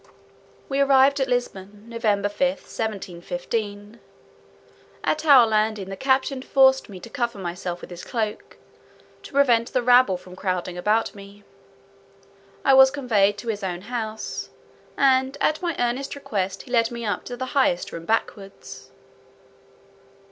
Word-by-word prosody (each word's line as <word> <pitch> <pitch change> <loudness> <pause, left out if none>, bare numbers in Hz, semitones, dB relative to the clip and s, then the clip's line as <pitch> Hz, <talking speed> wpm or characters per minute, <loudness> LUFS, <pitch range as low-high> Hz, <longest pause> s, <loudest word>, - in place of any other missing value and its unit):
We 275 0 -2
arrived 275 0 +4
at 265 - +1
Lisbon, 205 -4 -3
Nov. 230 0 -8
5, 205 -3 +1
1715. 215 -3 -4 1.0
At 310 - 0
our 270 -5 +8
landing, 215 -3 0
the 195 - -5
captain 265 +3 0
forced 265 -1 +3
me 190 -2 -9
to 235 - -10
cover 235 -1 -3
myself 175 -1 -5
with - - -11
his 175 0 -9
cloak, 220 -3 -4 0.6
to - - -12
prevent 245 -4 +3
the 255 - +1
rabble 245 -6 +5
from 180 0 -14
crowding 185 -2 -3
about 210 +5 0
me. 200 0 -13 1.2
I 270 - +5
was 265 0 +8
conveyed 220 -8 +1
to 230 +3 -6
his 205 -2 -3
own 180 -2 -3
house; 220 -1 -5 0.5
and 265 0 +3
at 310 - +1
my 340 -3 -2
earnest 245 +4 -2
request 195 -8 -3
he - - -14
led 230 -2 +3
me 235 -1 -6
up 205 -4 -2
to 245 - -6
the 260 - -3
highest 260 -11 +1
room 165 0 -8
backwards. 200 -2 -4
225 Hz, 145 wpm, -23 LUFS, 200-265 Hz, 1.2 s, our